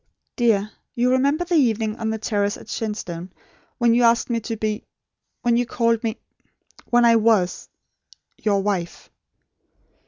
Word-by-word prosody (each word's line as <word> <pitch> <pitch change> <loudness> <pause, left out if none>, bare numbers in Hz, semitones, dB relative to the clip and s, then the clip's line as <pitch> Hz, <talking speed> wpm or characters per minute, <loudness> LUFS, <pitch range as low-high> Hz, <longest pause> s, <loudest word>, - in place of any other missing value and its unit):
Dear, 215 -4 +1 0.2
you 245 +1 +2
remember 280 +6 +2
the 350 - -3
evening 225 -8 +2
on 225 -1 -2
the 220 - -1
terrace 205 -2 -1
at - - -14
Shenstone, 185 -5 -5 0.5
when 235 -1 +3
you 240 - +3
asked 235 +1 +3
me 230 - +1
to 225 0 -5
be 215 0 -2 0.6
when 235 -1 +3
you 245 0 0
called 230 -1 +1
me 225 0 -2 0.7
when 240 0 +4
I 230 -1 +6
WAS 215 -5 +1 0.7
YOUR 200 -2 +1
WIFE? 190 -4 -3
225 Hz, 150 wpm, -22 LUFS, 210-240 Hz, 0.7 s, I